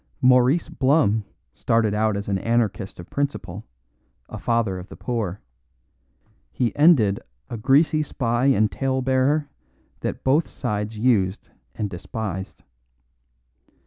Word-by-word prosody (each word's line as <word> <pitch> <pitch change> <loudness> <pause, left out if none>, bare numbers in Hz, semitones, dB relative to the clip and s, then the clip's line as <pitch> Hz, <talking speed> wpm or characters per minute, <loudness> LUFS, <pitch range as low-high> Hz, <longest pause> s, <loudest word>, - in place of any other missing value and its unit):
Maurice 125 +5 +4
Blum 130 -7 +2 0.3
started 115 -2 +1
out 105 -1 +1
as 100 - -5
an 100 -2 0
anarchist 115 -4 -1
of 85 - -11
principle, 125 -8 -3 0.6
a - - -7
father 115 -6 0
of 90 - -11
the - - -10
poor; 105 -6 -3 1.1
he 120 - -1
ended 135 - +4 0.3
a 120 - -3
greasy 145 +6 +3
spy 125 -3 0
and 110 -5 +3
tale 130 -1 -1
bearer 135 +3 +2 0.5
that - - -4
both 145 +5 +2
sides 105 -3 -4
used 105 -5 +1 0.2
and 105 - -2
despised. 95 0 -6
115 Hz, 120 wpm, -23 LUFS, 105-130 Hz, 1.1 s, Maurice